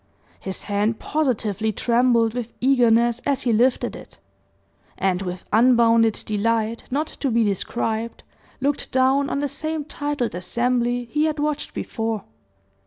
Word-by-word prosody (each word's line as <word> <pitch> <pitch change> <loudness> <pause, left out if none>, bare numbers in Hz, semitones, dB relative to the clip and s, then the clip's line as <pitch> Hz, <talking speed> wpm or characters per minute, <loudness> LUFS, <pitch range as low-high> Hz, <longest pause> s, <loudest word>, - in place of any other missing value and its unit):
His 190 -1 -5
hand 210 +2 0
positively 220 -8 -1
trembled 235 0 +2
with 240 -1 -5
eagerness 240 -2 +3
as 280 -1 0
he 240 - +2
lifted 245 +4 +2
it; - - -13 0.8
and 190 -1 0
with 180 -1 -5
unbounded 230 -1 +4
delight, 225 +2 -1
not 290 +4 0
to 285 -2 -4
be 230 -1 +2
described, 220 +3 -2 0.4
looked 280 +1 -1
down 265 +2 +2
on 280 - -1
the 290 - 0
same 310 +2 -3
titled 290 -5 -3
assembly 240 +6 0
he 300 +1 +2
had 310 -1 -1
watched 300 0 -2
before. 225 -3 -3
235 Hz, 135 wpm, -22 LUFS, 220-270 Hz, 0.8 s, unbounded